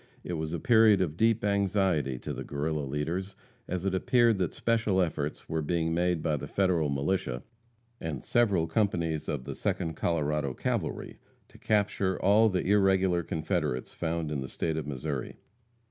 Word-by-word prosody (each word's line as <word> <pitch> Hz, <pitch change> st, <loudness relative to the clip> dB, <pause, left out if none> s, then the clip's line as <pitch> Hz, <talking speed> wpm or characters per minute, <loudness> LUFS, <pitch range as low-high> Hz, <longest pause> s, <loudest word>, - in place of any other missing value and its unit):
It 90 Hz, -, -4 dB
was 80 Hz, -1 st, -3 dB
a 85 Hz, -, -2 dB
period 110 Hz, -5 st, +5 dB
of 85 Hz, -5 st, -1 dB
deep 110 Hz, +3 st, +2 dB
anxiety 95 Hz, -9 st, +1 dB
to -, -, -5 dB
the -, -, -5 dB
Guerrilla 75 Hz, +1 st, -2 dB
leaders, 85 Hz, +8 st, -3 dB, 0.3 s
as 90 Hz, 0 st, -3 dB
it 95 Hz, -, 0 dB
appeared 115 Hz, +2 st, +3 dB
that 90 Hz, -3 st, -1 dB
special 115 Hz, -4 st, +1 dB
efforts 75 Hz, -4 st, -2 dB
were 80 Hz, 0 st, -1 dB
being 80 Hz, +1 st, 0 dB
made 85 Hz, -1 st, +1 dB
by 75 Hz, -, +1 dB
the -, -, -6 dB
Federal 90 Hz, -6 st, +1 dB
militia, 70 Hz, -3 st, -1 dB, 0.6 s
and 80 Hz, -5 st, -5 dB
several 100 Hz, -9 st, +2 dB
companies 80 Hz, -4 st, 0 dB
of 75 Hz, -4 st, -2 dB
the -, -, -5 dB
Second 80 Hz, -, -2 dB
Colorado 75 Hz, -4 st, -1 dB
Cavalry, -, -, -3 dB, 0.3 s
to -, -, -17 dB
capture 100 Hz, -3 st, +1 dB
all 105 Hz, +4 st, +5 dB
the 95 Hz, -2 st, -1 dB
irregular 95 Hz, -3 st, +3 dB
Confederates 80 Hz, -5 st, -2 dB
found 85 Hz, -2 st, -2 dB
in 70 Hz, -3 st, -2 dB
the 65 Hz, -, -6 dB
State 80 Hz, -, -2 dB
of 80 Hz, -2 st, -3 dB
Missouri. 70 Hz, -1 st, -4 dB
85 Hz, 165 wpm, -29 LUFS, 75-95 Hz, 0.6 s, period